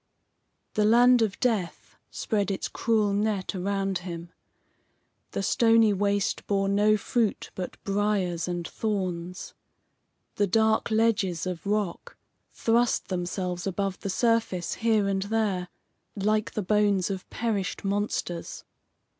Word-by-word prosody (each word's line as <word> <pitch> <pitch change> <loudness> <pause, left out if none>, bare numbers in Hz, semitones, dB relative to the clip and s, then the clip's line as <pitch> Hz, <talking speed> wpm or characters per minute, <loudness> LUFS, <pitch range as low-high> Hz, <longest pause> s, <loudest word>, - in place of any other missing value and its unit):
The 215 - +2
land 240 +3 +6
of 215 -3 0
death 220 -9 -1
spread 205 -3 -1
its 195 - -2
cruel 215 -3 +1
net 205 -2 0
around 195 0 -1
him. 170 -1 -7 1.0
The 195 - -2
stony 225 0 +4
waste 200 0 0
bore 195 -1 +1
no 210 +2 +3
fruit 220 0 -1
but 185 -1 -6
briers 195 -4 0
and 175 -1 -3
thorns. 180 -4 -3 0.8
The 205 - +2
dark 220 +3 +2
ledges 215 -7 +1
of 180 -1 -5
rock 205 -4 -2 0.3
thrust 235 +1 +1
themselves 180 0 -3
above 195 0 -2
the 195 - -4
surface 225 -5 +1
here 220 -3 +3
and 195 -1 0
there, 200 -3 -1 0.5
like 215 +1 0
the 215 - -2
bones 205 -1 +2
of 190 -1 -6
perished 210 -5 -2
monsters. 195 -4 -2
200 Hz, 120 wpm, -27 LUFS, 185-215 Hz, 1.0 s, land